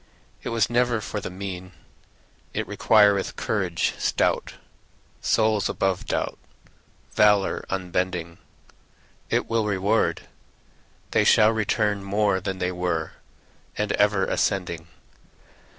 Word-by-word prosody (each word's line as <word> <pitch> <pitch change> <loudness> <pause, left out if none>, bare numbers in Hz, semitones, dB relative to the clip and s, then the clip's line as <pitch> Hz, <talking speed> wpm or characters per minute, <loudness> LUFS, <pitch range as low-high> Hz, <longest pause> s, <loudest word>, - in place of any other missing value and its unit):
It - - -5
was 115 -3 +2
never 120 -1 +1
for 105 0 -4
the - - -6
mean; 95 -1 -7 0.8
It - - -2
requireth 105 -3 +3
courage 95 -6 -1
stout. - - 0 0.7
Souls 110 -3 +2
above 95 -1 -1
doubt, - - -2 0.7
Valor 105 -2 +3
unbending, 90 -2 -2 0.9
It - - 0
will 115 -2 0
reward, 100 +2 +1 0.9
They - - +3
shall 110 0 +5
return 105 -2 0
More 100 -1 +1
than 95 0 -3
they 90 0 -1
were, 90 -3 -2 0.7
And 105 -1 -1
ever 105 -2 +2
ascending. 85 -4 -1
100 Hz, 105 wpm, -24 LUFS, 90-105 Hz, 0.9 s, shall